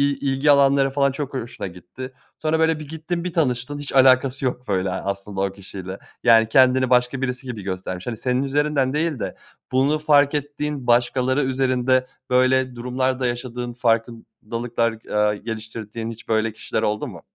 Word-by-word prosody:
i -, -, -8 dB
ilgi 145 Hz, +2 st, +3 dB
alanları 140 Hz, -1 st, +4 dB
falan 140 Hz, 0 st, +2 dB
çok 140 Hz, 0 st, -5 dB
ho 130 Hz, -, -1 dB
hoşuna 115 Hz, -4 st, -6 dB
gitti. 90 Hz, +9 st, -9 dB, 0.3 s
Sonra 160 Hz, +1 st, +1 dB
böyle 160 Hz, -1 st, +2 dB
bir 150 Hz, -, -8 dB
gittin, 160 Hz, +2 st, -4 dB
bir 180 Hz, -2 st, -4 dB
tanıştın 140 Hz, -2 st, 0 dB
hiç 145 Hz, -, -7 dB
alakası 130 Hz, 0 st, +4 dB
yok, 125 Hz, 0 st, -3 dB
böyle, 95 Hz, -1 st, 0 dB
aslında 100 Hz, +1 st, -4 dB
o 100 Hz, 0 st, 0 dB
kişiyle. 95 Hz, -1 st, -8 dB, 0.2 s
Yani 115 Hz, -2 st, +6 dB
kendini 130 Hz, 0 st, +4 dB
başka 125 Hz, +1 st, +2 dB
birisi 130 Hz, 0 st, -3 dB
gibi 115 Hz, -4 st, -5 dB
göstermiş 95 Hz, +1 st, -5 dB
hani, 115 Hz, -2 st, -3 dB
senin 125 Hz, +3 st, 0 dB
üzerinden 140 Hz, -1 st, +1 dB
değil 155 Hz, -4 st, 0 dB
de -, -, -4 dB, 0.4 s
bunu 140 Hz, +4 st, +2 dB
fark 145 Hz, -1 st, +4 dB
ettiğin 145 Hz, -2 st, -3 dB
başkaları 125 Hz, +3 st, +2 dB
üzerinde 130 Hz, -1 st, +1 dB, 0.2 s
böyle 130 Hz, 0 st, +3 dB
durumlar 125 Hz, +2 st, -1 dB
da 125 Hz, -, +1 dB
yaşadığın 120 Hz, 0 st, -4 dB
farkındalıklar, 115 Hz, 0 st, -1 dB, 0.2 s
aaa, 105 Hz, 0 st, +2 dB
geliştirdiğin 110 Hz, +1 st, -6 dB
hiç 115 Hz, +2 st, -12 dB
böyle 110 Hz, 0 st, +1 dB
kişiler 110 Hz, -, -3 dB
oldu 105 Hz, -1 st, -1 dB
mu? -, -, -10 dB
125 Hz, 170 wpm, -22 LUFS, 115-135 Hz, 0.4 s, Yani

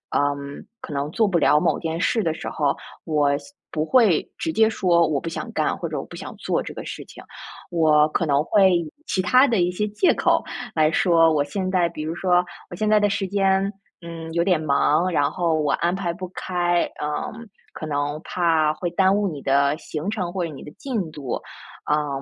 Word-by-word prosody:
嗯， 140 Hz, 0 st, -2 dB, 0.2 s
可 150 Hz, -, -7 dB
能 140 Hz, +1 st, -2 dB
做 220 Hz, +5 st, +2 dB
不 185 Hz, -3 st, +1 dB
了 150 Hz, -2 st, +4 dB
某 -, -, +1 dB
件 165 Hz, 0 st, -3 dB
事 220 Hz, +5 st, +1 dB
的 160 Hz, -, 0 dB
时 -, -, -7 dB
候， 145 Hz, -2 st, 0 dB, 0.3 s
我 145 Hz, -3 st, +1 dB
现 280 Hz, -, -13 dB, 0.2 s
不 155 Hz, -1 st, -1 dB
会 220 Hz, -6 st, +3 dB
直 325 Hz, -, -1 dB
接 220 Hz, -7 st, +4 dB
说， 175 Hz, -5 st, +3 dB
我 150 Hz, -2 st, 0 dB
不 165 Hz, -, -4 dB
想 165 Hz, -, -6 dB
干， -, -, 0 dB
或 -, -, -4 dB
者 -, -, -4 dB
我 -, -, -5 dB
不 -, -, -12 dB
想 -, -, -8 dB
做 -, -, -1 dB
这 -, -, -7 dB
个 -, -, -7 dB
事 -, -, -6 dB
情。 -, -, -13 dB, 0.5 s
我 155 Hz, -3 st, +4 dB
可 165 Hz, -, 0 dB
能 145 Hz, -1 st, +2 dB
会 195 Hz, +2 st, +4 dB
以 165 Hz, -3 st, -2 dB
其 190 Hz, -, 0 dB
它 255 Hz, +9 st, +5 dB
的 225 Hz, -7 st, +1 dB
一 175 Hz, -, +2 dB
些 210 Hz, +4 st, -2 dB
借 210 Hz, -, +3 dB
口 -, -, +2 dB, 0.3 s
来 155 Hz, -1 st, +3 dB
说， 165 Hz, -2 st, +4 dB
我 145 Hz, -2 st, +2 dB
现 185 Hz, +6 st, -3 dB
在 180 Hz, -2 st, +2 dB
比 165 Hz, -, -7 dB
如 160 Hz, +2 st, -4 dB
说： 180 Hz, -1 st, +2 dB, 0.3 s
“我 -, -, -5 dB
现 215 Hz, +4 st, -1 dB
在 215 Hz, 0 st, +5 dB
的 205 Hz, 0 st, +2 dB
时 195 Hz, -1 st, -1 dB
间， 195 Hz, 0 st, +1 dB, 0.3 s
嗯， 165 Hz, -1 st, -8 dB
有 170 Hz, 0 st, +2 dB
点 180 Hz, -3 st, +2 dB
忙， 155 Hz, +4 st, +2 dB
然 145 Hz, -4 st, +2 dB
后 170 Hz, -3 st, 0 dB
我 145 Hz, -2 st, +1 dB
安 175 Hz, +1 st, +1 dB
排 185 Hz, -2 st, -2 dB
不 185 Hz, +2 st, -7 dB
开， 175 Hz, -1 st, 0 dB, 0.2 s
嗯， 150 Hz, +10 st, -4 dB, 0.3 s
可 155 Hz, -, -6 dB
能 145 Hz, 0 st, -2 dB
怕 160 Hz, -3 st, +1 dB
会 175 Hz, +3 st, -3 dB
耽 190 Hz, +2 st, +3 dB
误 205 Hz, 0 st, +1 dB
你 155 Hz, -6 st, -5 dB
的 140 Hz, +2 st, +2 dB
行 160 Hz, +4 st, -5 dB
程， 185 Hz, -5 st, -3 dB
或 190 Hz, -2 st, -1 dB
者 165 Hz, -, -4 dB
你 135 Hz, -, -10 dB
的 150 Hz, -, -10 dB
进 210 Hz, -, -4 dB
度。” 140 Hz, -5 st, -4 dB, 0.5 s
嗯， 145 Hz, -2 st, 0 dB
170 Hz, 240 characters per minute, -23 LUFS, 150-190 Hz, 0.5 s, 它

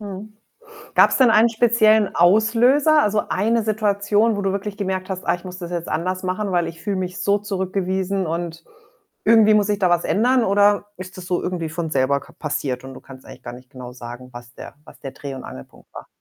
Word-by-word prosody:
Mhm. 205 Hz, +1 st, -8 dB, 0.6 s
Gab's -, -, +5 dB
denn 260 Hz, -3 st, +5 dB
einen 225 Hz, +2 st, +5 dB
speziellen 220 Hz, -2 st, +3 dB
Auslöser? 235 Hz, -, +4 dB
Also, 210 Hz, -2 st, 0 dB
eine 225 Hz, +3 st, +1 dB
Situation, 210 Hz, +1 st, +1 dB
wo 205 Hz, -, -3 dB
du 195 Hz, -1 st, 0 dB
wirklich 200 Hz, +1 st, -4 dB
gemerkt 190 Hz, -2 st, -3 dB
hast: 185 Hz, -1 st, -5 dB
„Ah, 170 Hz, -, +2 dB
ich 175 Hz, -, -15 dB
muss 180 Hz, 0 st, -8 dB
das 175 Hz, -1 st, -7 dB
jetzt 170 Hz, -1 st, -4 dB
anders 185 Hz, +3 st, -2 dB
machen, 190 Hz, +2 st, -2 dB
weil 175 Hz, -2 st, +1 dB
ich 165 Hz, 0 st, -9 dB
fühle 205 Hz, -2 st, -2 dB
mich 185 Hz, 0 st, -4 dB
so 200 Hz, 0 st, +2 dB
zurückgewiesen 190 Hz, -1 st, -2 dB
und 165 Hz, 0 st, -5 dB, 0.6 s
irgendwie 220 Hz, -2 st, +5 dB
muss 210 Hz, -1 st, +3 dB
sich 205 Hz, -1 st, -1 dB
da 185 Hz, -3 st, +2 dB
was 175 Hz, -1 st, +1 dB
ändern?“ 250 Hz, +4 st, +2 dB
Oder 205 Hz, +1 st, +3 dB
ist 185 Hz, +1 st, -10 dB
das 180 Hz, -, -9 dB
so 180 Hz, 0 st, -1 dB
irgendwie 175 Hz, -3 st, -3 dB
von 160 Hz, 0 st, -4 dB
selber 140 Hz, 0 st, +1 dB
ka -, -, -17 dB
passiert 140 Hz, -4 st, -4 dB
und 130 Hz, 0 st, -10 dB
du -, -, -11 dB
kannst 130 Hz, -1 st, -14 dB
eigentlich 125 Hz, -, -13 dB
gar -, -, -8 dB
nicht 125 Hz, +1 st, -14 dB
genau 125 Hz, -2 st, -10 dB
sagen, 125 Hz, +1 st, -10 dB
was 120 Hz, 0 st, -12 dB
der -, -, -11 dB
was -, -, -16 dB
der 135 Hz, -2 st, -7 dB
Dreh 140 Hz, -1 st, -8 dB
und 130 Hz, -, -9 dB
Angelpunkt 65 Hz, 0 st, -13 dB
war? -, -, -10 dB
190 Hz, 220 wpm, -21 LUFS, 165-210 Hz, 0.6 s, Gab's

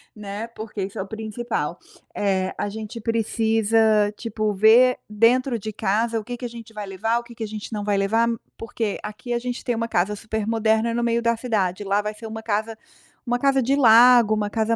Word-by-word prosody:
né, 210 Hz, +1 st, -6 dB
porque 215 Hz, -2 st, -5 dB
isso 195 Hz, +1 st, -6 dB
é -, -, -1 dB
o -, -, -12 dB
principal. 220 Hz, -6 st, -4 dB, 0.4 s
Eh, 190 Hz, -2 st, 0 dB
a -, -, -2 dB
gente 220 Hz, +2 st, -7 dB
precisa, 225 Hz, 0 st, +1 dB, 0.4 s
tipo, 215 Hz, -2 st, -2 dB
ver 230 Hz, +5 st, +5 dB
dentro 235 Hz, +3 st, +2 dB
de 215 Hz, +2 st, -5 dB
casa 225 Hz, +4 st, 0 dB
o 215 Hz, -, -8 dB
que 245 Hz, +2 st, -6 dB
que 245 Hz, -, -6 dB
a -, -, -4 dB
gente 230 Hz, -1 st, -11 dB
vai 210 Hz, -2 st, -6 dB
levar, 225 Hz, +5 st, -1 dB
o 240 Hz, -, -10 dB
que 235 Hz, -1 st, -14 dB
que 225 Hz, -, -5 dB
a -, -, -3 dB
gente 215 Hz, +1 st, -7 dB
não 210 Hz, -, -3 dB
vai 205 Hz, -1 st, +1 dB
levar, 225 Hz, +4 st, +2 dB, 0.3 s
porque 225 Hz, -2 st, -3 dB
aqui 215 Hz, +4 st, -5 dB
a 240 Hz, -, 0 dB
gente 245 Hz, 0 st, -5 dB
tem 245 Hz, -, -1 dB
uma 230 Hz, +1 st, -2 dB
casa 205 Hz, +1 st, +1 dB
super 220 Hz, 0 st, -4 dB
moderna 225 Hz, 0 st, +1 dB
no 240 Hz, -, 0 dB
meio 235 Hz, 0 st, +1 dB
da 235 Hz, 0 st, +1 dB
cidade, 205 Hz, -6 st, -1 dB
lá 200 Hz, +1 st, +1 dB
vai 210 Hz, +1 st, -4 dB
ser 225 Hz, -, -11 dB
uma 220 Hz, 0 st, -6 dB
casa 220 Hz, +1 st, -2 dB, 0.5 s
uma 245 Hz, 0 st, 0 dB
casa 275 Hz, +1 st, +2 dB
de 265 Hz, +3 st, +1 dB
lago, 240 Hz, -3 st, +7 dB
uma 210 Hz, -1 st, -1 dB
casa 225 Hz, +1 st, 0 dB
220 Hz, 220 wpm, -23 LUFS, 210-235 Hz, 0.5 s, lago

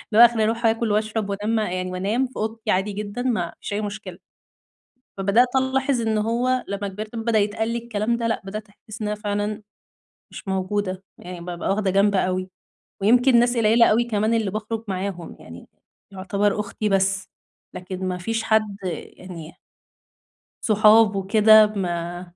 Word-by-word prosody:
هُو -, -, +6 dB
آخري 230 Hz, -2 st, +2 dB
أروح 230 Hz, +2 st, 0 dB
آكل 225 Hz, -1 st, +1 dB
وأشرب 215 Hz, 0 st, -1 dB
وأنا 200 Hz, +1 st, -4 dB
مع 215 Hz, -5 st, 0 dB
يعني 185 Hz, 0 st, -3 dB
وأنام 205 Hz, +8 st, -1 dB
في 255 Hz, -, -21 dB
أوضتي 220 Hz, +1 st, -3 dB
عادي 190 Hz, +3 st, 0 dB
جدًا، 210 Hz, +3 st, -5 dB
ما 215 Hz, -10 st, -1 dB
فيش -, -, -5 dB
أي 210 Hz, -, -1 dB
مشكلة. 205 Hz, +1 st, -6 dB, 1.0 s
فبدأت 200 Hz, +6 st, +3 dB
ألاحظ 265 Hz, 0 st, +1 dB
إن 220 Hz, -1 st, 0 dB
هُو 245 Hz, +4 st, 0 dB
لما 200 Hz, 0 st, -3 dB
كبرت، 215 Hz, +4 st, -7 dB
ب 225 Hz, -, -4 dB
بدأ 230 Hz, -2 st, +2 dB
يتقالّي 220 Hz, +3 st, -1 dB
الكلام 230 Hz, 0 st, -2 dB
ده 235 Hz, -1 st, -2 dB
لأ، 225 Hz, -, -1 dB
بدأت 215 Hz, +2 st, -7 dB
أحس 215 Hz, +2 st, -13 dB
إن 210 Hz, -, -2 dB
أنا 210 Hz, -, -2 dB
فعلًا 210 Hz, 0 st, -3 dB, 0.7 s
مش -, -, -10 dB
موجودة، 190 Hz, 0 st, -2 dB, 0.2 s
يعني 180 Hz, -1 st, -9 dB
بابقى 175 Hz, 0 st, -4 dB
واخدة 195 Hz, -1 st, +1 dB
جنب 200 Hz, +2 st, +3 dB
أوي، 185 Hz, 0 st, 0 dB, 0.5 s
ويمكن 245 Hz, +4 st, +5 dB
ناس 240 Hz, +1 st, +2 dB
قليلة 230 Hz, +1 st, +5 dB
اوي 230 Hz, +3 st, +3 dB
كمان 220 Hz, -1 st, 0 dB
اللي 220 Hz, -4 st, 0 dB
بخرج 220 Hz, +1 st, -4 dB
معاهم، 185 Hz, -3 st, -4 dB
يعني 85 Hz, +1 st, -12 dB, 0.4 s
يعتبر 200 Hz, +2 st, -1 dB
أختي 210 Hz, +1 st, -3 dB
بس، 195 Hz, 0 st, +1 dB, 0.4 s
لكن 185 Hz, +1 st, -6 dB
ما 180 Hz, -1 st, -2 dB
فيش 225 Hz, +5 st, -2 dB
حد 215 Hz, -2 st, +1 dB
يعني 175 Hz, -1 st, -7 dB, 1.1 s
صُحاب 215 Hz, 0 st, +5 dB
وكده 215 Hz, +2 st, +6 dB
ما 175 Hz, -4 st, -4 dB
210 Hz, 165 wpm, -23 LUFS, 195-225 Hz, 1.1 s, هُو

